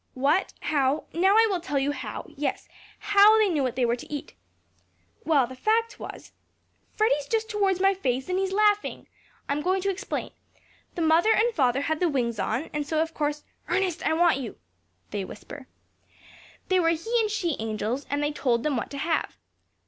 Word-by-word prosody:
What 290 +9 +1
how 285 -1 +1
now 380 +4 +3
I 450 +1 +7
will 370 - 0
tell 295 -4 -3
you 275 +1 +1
how, 290 - -6
yes, 280 -2 -3 0.3
how 410 +2 +6
they 430 -2 +4
knew 310 -5 0
what 255 -3 -1
they 250 -1 +2
were 235 0 +1
to 245 - -12
eat. 290 -2 -6 0.9
Well, 290 -5 +4
the 260 +2 -10
fact 450 - 0
was, - - -9 0.6
that - - -36
Freddy's 295 -10 +2
just 445 -1 -1
towards 395 -3 +1
my 390 +1 +4
face, 260 -8 -2
and 365 +1 0
he's 385 0 -1
laughing! 415 +1 +1 0.4
I'm 285 +1 -1
going 370 +4 +1
to 395 - +1
explain. 400 +2 -4 0.6
The 340 - -1
mother 325 +7 +4
and 460 +2 +3
father 265 - +2
had 315 +2 -1
the 355 - +2
wings 235 -6 -1
on, 245 +9 -2
and 295 -1 -2
so, 315 0 0
of 325 +1 -1
course 295 0 -2 0.2
Ernest, 370 -3 0
I - - +2
want 335 -3 +3
you!" 240 -5 -6 0.5
(They 205 -1 -2
whisper.) 255 +7 -10 1.0
"they 370 -1 +4
were 330 -2 +3
he 390 +9 0
and 430 - 0
she 350 -7 -1
angels, 220 +4 -3
and 285 +1 -1
they 295 - 0
told 245 -5 0
them 300 -2 0
what - - -3
to 280 - -7
have. 320 +3 -1
315 Hz, 195 wpm, -26 LUFS, 275-385 Hz, 1.0 s, I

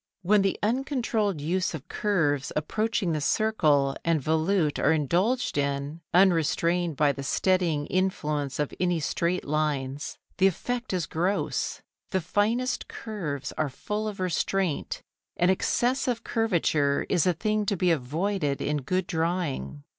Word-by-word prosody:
When 205 +3 +4
the 195 -1 +1
uncontrolled 230 - 0
use 175 +4 -1
of 145 - -9
curves 160 -10 0
approaching 215 +4 0
the 155 -1 -1
circle 145 -8 +2
and 165 -2 +2
volute 160 +2 +1
are 150 - +3
indulged 175 - +1
in, 140 +3 -2
unrestrained 170 -2 +3
by 150 -2 +4
the 140 - -6
steadying 170 0 +1
influence 150 -7 -1
of 150 -1 -1
any 175 -2 +1
straight 170 +4 -1
lines, 145 -2 -2 0.2
the 190 - +6
effect 245 +7 -2
is 180 -4 0
gross. 180 +5 -1 0.3
The 190 - +1
finest 215 +8 0
curves 165 - -5
are 155 - +1
full 210 +10 -3
of 205 -2 -5
restraint, 185 -2 -1 0.3
and 175 +2 +4
excessive 245 +4 0
curvature 160 -10 +1
is 180 -2 +2
a 180 - +4
thing 215 +4 -1
to 200 - +1
be 180 0 +3
avoided 155 +2 -1
in 150 +1 0
good 180 +7 -1
drawing. 165 -4 -2
175 Hz, 140 wpm, -27 LUFS, 150-200 Hz, 0.3 s, the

